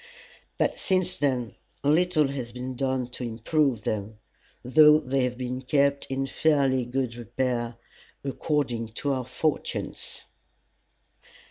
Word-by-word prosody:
but -, -, +1 dB
since 185 Hz, -1 st, +1 dB
then 125 Hz, -, -1 dB, 0.3 s
little 155 Hz, 0 st, +3 dB
has 130 Hz, -4 st, -4 dB
been 125 Hz, +1 st, -5 dB
done 130 Hz, -1 st, 0 dB
to 125 Hz, +1 st, -7 dB
improve 120 Hz, +1 st, 0 dB
them, 105 Hz, 0 st, -3 dB, 0.5 s
though 150 Hz, +4 st, +7 dB
they 135 Hz, -2 st, 0 dB
have 125 Hz, -1 st, -3 dB
been 125 Hz, 0 st, -3 dB
kept 140 Hz, +1 st, +2 dB
in 135 Hz, 0 st, -1 dB
fairly 135 Hz, -3 st, +2 dB
good 125 Hz, -1 st, -2 dB
repair, 120 Hz, 0 st, -2 dB, 0.5 s
according 135 Hz, -4 st, -1 dB
to 140 Hz, +6 st, -2 dB
our 130 Hz, -1 st, -1 dB
fortunes. 145 Hz, +4 st, -3 dB
130 Hz, 120 wpm, -27 LUFS, 120-145 Hz, 0.5 s, though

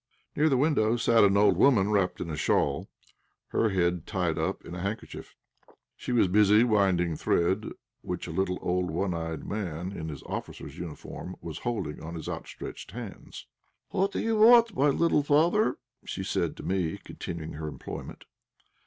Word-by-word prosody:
Near 155 Hz, +2 st, +3 dB
the 135 Hz, -, +3 dB
window 125 Hz, -5 st, +2 dB
sat 115 Hz, -1 st, +4 dB
an 100 Hz, 0 st, +4 dB
old 105 Hz, +1 st, +5 dB
woman 105 Hz, -7 st, +4 dB
wrapped 90 Hz, -4 st, +1 dB
in 85 Hz, -, -4 dB
a -, -, -3 dB
shawl, 70 Hz, -1 st, 0 dB, 0.6 s
her 115 Hz, -, +2 dB
head 90 Hz, -3 st, 0 dB
tied 90 Hz, -5 st, -1 dB
up -, -, -2 dB
in -, -, -8 dB
a 90 Hz, -, -5 dB
handkerchief. 100 Hz, +4 st, -6 dB, 0.6 s
She -, -, -6 dB
was 120 Hz, -5 st, +4 dB
busy 105 Hz, +3 st, +5 dB
winding 95 Hz, -7 st, +2 dB
thread, 95 Hz, +7 st, +1 dB, 0.3 s
which -, -, -4 dB
a -, -, -6 dB
little, 95 Hz, -1 st, 0 dB
old, 90 Hz, 0 st, 0 dB
one 90 Hz, +3 st, -1 dB
eyed 80 Hz, -1 st, -4 dB
man 90 Hz, -3 st, -4 dB
in 80 Hz, -5 st, -5 dB
an 75 Hz, -, -6 dB
officer's 70 Hz, -, -6 dB
uniform 85 Hz, +1 st, -7 dB
was 80 Hz, -1 st, -7 dB
holding 115 Hz, -11 st, -3 dB
on 85 Hz, +2 st, -7 dB
his 80 Hz, -, -7 dB
outstretched -, -, -7 dB
hands. 115 Hz, -4 st, -9 dB, 0.4 s
"What 195 Hz, +1 st, 0 dB
do -, -, -3 dB
you 225 Hz, -1 st, 0 dB
want, 230 Hz, 0 st, +7 dB
my 140 Hz, -, +3 dB
little 165 Hz, +1 st, +3 dB
father?" 165 Hz, +9 st, +3 dB, 0.3 s
she 95 Hz, -, -5 dB
said -, -, -1 dB
to -, -, -8 dB
me, 90 Hz, -4 st, -1 dB
continuing 80 Hz, -2 st, -6 dB
her 75 Hz, +1 st, -5 dB
employment. 75 Hz, -, -8 dB
95 Hz, 170 wpm, -28 LUFS, 85-120 Hz, 0.6 s, want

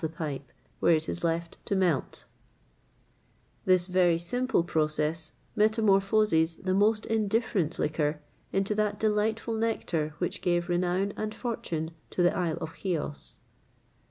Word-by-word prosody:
[XXVIII 155 Hz, -3 st, -3 dB, 0.4 s
116] 170 Hz, +3 st, 0 dB, 1.9 s
This 185 Hz, -2 st, +4 dB
very 180 Hz, -2 st, +3 dB
simple 245 Hz, +5 st, 0 dB
process 155 Hz, -1 st, -1 dB, 0.2 s
metamorphoses 205 Hz, -5 st, +3 dB
the 185 Hz, +2 st, -2 dB
most 210 Hz, +2 st, +3 dB
indifferent 215 Hz, -6 st, 0 dB
liquor 150 Hz, 0 st, 0 dB, 0.3 s
into 195 Hz, +2 st, +1 dB
that 210 Hz, -1 st, 0 dB
delightful 220 Hz, +1 st, 0 dB
nectar 175 Hz, -9 st, -1 dB
which 175 Hz, +1 st, -3 dB
gave 175 Hz, 0 st, +1 dB
renown 180 Hz, +3 st, +1 dB
and 215 Hz, 0 st, -4 dB
fortune 165 Hz, -10 st, -3 dB, 0.2 s
to 180 Hz, -, 0 dB
the 175 Hz, -, +3 dB
isle 170 Hz, -3 st, 0 dB
of 160 Hz, -1 st, -7 dB
Cos. 165 Hz, -6 st, -3 dB
180 Hz, 105 wpm, -28 LUFS, 160-210 Hz, 1.9 s, This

